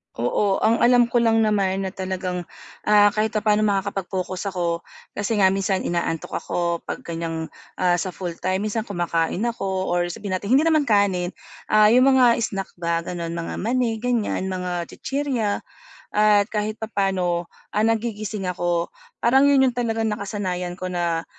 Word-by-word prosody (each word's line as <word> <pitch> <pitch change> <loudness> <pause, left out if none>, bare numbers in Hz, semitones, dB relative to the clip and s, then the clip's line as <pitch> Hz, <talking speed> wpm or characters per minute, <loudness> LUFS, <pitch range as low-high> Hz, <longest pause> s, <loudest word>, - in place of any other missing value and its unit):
Oo. 195 - 0
Ang 230 +1 +3
alam 245 0 +5
ko 240 - +3
lang 225 -1 +3
naman 195 -2 +1
na 190 - -3
talagang, 185 -2 -4 0.4
ah, 205 -1 +6
kahit 215 +1 -1
papa'no 215 0 +2
makakapag-focus 195 -1 -2
ako 175 -3 -1 0.3
kasi 205 +2 -2
nga 190 -1 +5
minsan 195 0 0
inaantok 170 -2 -2
ako 170 -1 -1
'pag - - -5
ganiyang, 165 -1 -4 0.2
ah, 175 -1 +2
sa 185 0 -4
full-time. 185 +2 -2
Minsan 215 +1 -2
kumakain 175 +1 -1
ako 190 -6 -2
or 175 0 +1
sabihin 185 +2 -4
natin 210 +7 +1
hindi 290 - +5
naman 310 -4 +2
kanin, 195 -4 +2 0.3
ah, 215 0 +5
'yung 255 +2 +5
mga 245 -3 +5
snack 195 -4 -3
ba 170 0 0
gano'n, 170 -1 -4
mga 165 -1 -4
mani 230 0 0
ganiyan, 235 -5 -1
mga 180 -2 -3
chichirya 265 -7 -1 0.5
at 210 -1 +4
kahit 215 0 -1
papa'no, 190 -5 -1 0.2
ah, 210 +1 +1
nagigising 215 -2 -2
ako. 175 -1 -1 0.3
Parang 265 +4 +5
'yun 275 -1 +5
'yung 255 - +2
talagang 225 -3 -1
nakasanayan 185 -4 -3
ko 185 0 -5
na, 170 -1 -1
195 Hz, 155 wpm, -23 LUFS, 180-220 Hz, 0.5 s, ah